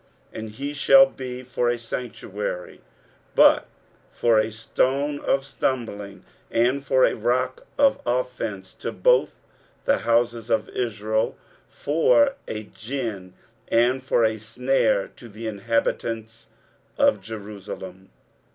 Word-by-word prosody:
23:008:014 -, -, -6 dB
And 110 Hz, 0 st, -6 dB
he 140 Hz, +5 st, -4 dB
shall 135 Hz, -1 st, +7 dB
be 130 Hz, -1 st, -7 dB
for 125 Hz, -1 st, 0 dB
a 120 Hz, -, 0 dB
sanctuary; 110 Hz, -5 st, -5 dB, 0.5 s
but -, -, +6 dB, 0.4 s
for 115 Hz, -2 st, +3 dB
a 110 Hz, +1 st, +1 dB
stone 135 Hz, +6 st, 0 dB
of 135 Hz, 0 st, 0 dB
stumbling 110 Hz, -8 st, -3 dB, 0.2 s
and 125 Hz, +4 st, +1 dB
for 130 Hz, -2 st, +4 dB
a -, -, +1 dB
rock 125 Hz, +3 st, -1 dB
of 280 Hz, -1 st, +4 dB
offence 120 Hz, -6 st, -3 dB
to -, -, -5 dB
both -, -, +2 dB, 0.4 s
the 280 Hz, -, +3 dB
houses 115 Hz, -1 st, +1 dB
of 110 Hz, -1 st, +1 dB
Israel, 110 Hz, -2 st, -1 dB, 0.3 s
for 270 Hz, -, +3 dB
a 110 Hz, 0 st, -4 dB
gin 110 Hz, -6 st, -6 dB, 0.3 s
and 120 Hz, +3 st, +3 dB
for 125 Hz, -2 st, +2 dB
a 110 Hz, 0 st, +1 dB
snare 115 Hz, -1 st, +1 dB
to 120 Hz, -, -14 dB
the 110 Hz, +2 st, -9 dB
inhabitants 115 Hz, +1 st, -2 dB, 0.5 s
of 105 Hz, -, +3 dB
Jerusalem. 100 Hz, -3 st, -8 dB
115 Hz, 125 wpm, -24 LUFS, 110-130 Hz, 0.5 s, shall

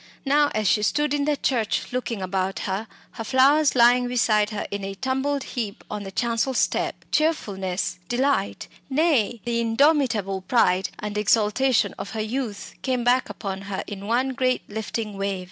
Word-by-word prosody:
Now, 290 Hz, +1 st, +4 dB
as 215 Hz, -1 st, +1 dB
she 210 Hz, -, +3 dB
stood 295 Hz, +7 st, +1 dB
in 285 Hz, -1 st, 0 dB
the 295 Hz, -1 st, +1 dB
church, 240 Hz, -3 st, -1 dB
looking 235 Hz, -5 st, -2 dB
about 190 Hz, +1 st, -2 dB
her, 200 Hz, +3 st, -3 dB, 0.2 s
her 225 Hz, -, -6 dB
flowers 275 Hz, +6 st, +4 dB
lying 245 Hz, +1 st, +5 dB
beside 215 Hz, -4 st, +2 dB
her 210 Hz, -, -4 dB
in 200 Hz, 0 st, -4 dB
a 195 Hz, 0 st, -4 dB
tumbled 265 Hz, +4 st, -1 dB
heap 220 Hz, -5 st, -5 dB
on 210 Hz, 0 st, -3 dB
the 195 Hz, -1 st, -7 dB
chancel 235 Hz, +5 st, 0 dB
step, -, -, 0 dB
cheerfulness, 195 Hz, -, -1 dB
delight, 245 Hz, -, 0 dB, 0.2 s
nay, 265 Hz, -7 st, +2 dB
the 235 Hz, -1 st, 0 dB
indomitable 230 Hz, -5 st, +2 dB
pride 185 Hz, -3 st, +2 dB
and 210 Hz, 0 st, -3 dB
exultation 215 Hz, +2 st, +2 dB
of -, -, -5 dB
her -, -, -2 dB
youth, 220 Hz, -1 st, -4 dB
came 255 Hz, -2 st, -1 dB
back 250 Hz, +2 st, +2 dB
upon 195 Hz, -2 st, -5 dB
her 195 Hz, -, -3 dB
in 200 Hz, -1 st, -7 dB
one 245 Hz, +4 st, +1 dB
great 255 Hz, -1 st, 0 dB
lifting 215 Hz, -1 st, -4 dB
wave. 195 Hz, -1 st, -1 dB
230 Hz, 165 wpm, -24 LUFS, 200-265 Hz, 0.2 s, lying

